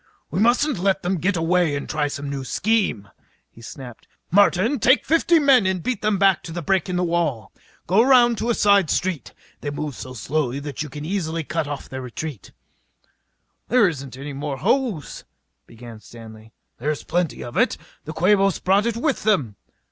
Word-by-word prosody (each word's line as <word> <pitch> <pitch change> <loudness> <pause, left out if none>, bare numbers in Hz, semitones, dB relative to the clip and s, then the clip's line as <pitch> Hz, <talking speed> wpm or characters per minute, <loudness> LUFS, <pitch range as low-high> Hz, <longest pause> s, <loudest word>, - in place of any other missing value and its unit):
"We - - -2
mustn't 245 - +2
let 195 +1 0
them 180 0 -1
get 185 +2 0
away 165 -2 +1
to - - -7
try 150 -1 -1
some 140 0 -6
new 140 -1 -4
scheme!" 185 - 0 0.4
he 115 - -16
snapped. 120 0 -11 0.2
"Martin, 205 - +3
take 260 +3 +4
fifty 330 +1 +3
men 275 -9 +4
and 185 -2 -1
beat 250 -4 -2
them 215 -1 +1
back 195 -1 +3
to 165 - -9
the 170 +1 -5
break 190 +1 0
in 180 - -2
the 180 - 0
wall. 160 - -1 0.3
Go 190 +6 +4
around 240 -2 +4
a 235 0 0
side 200 -5 +3
street. 180 -5 -2 0.3
They 145 - -4
move 145 0 -4
so 130 0 -9
slowly 135 +1 -2
that 145 0 -6
you 155 - -5
can 145 +2 -7
easily 165 -3 -2
cut 160 0 -3
off 145 -2 -6
their 130 0 -7
retreat." 130 - -7 1.2
"There 245 -3 +4
isn't 140 -6 -6
any 140 +1 -7
more 140 0 -4
hose 225 - -1 0.2
" - - -52
began 115 -1 -12
Stanley. 110 -1 -13 0.3
"There's 150 0 -2
plenty 175 -3 -2
of 120 - -9
it. - - +2 0.3
The 155 - -6
Quabos 195 +3 +3
brought 200 +4 +2
it 230 -1 -2
with 275 +3 -1
them." 150 - +1
170 Hz, 185 wpm, -22 LUFS, 140-205 Hz, 1.2 s, take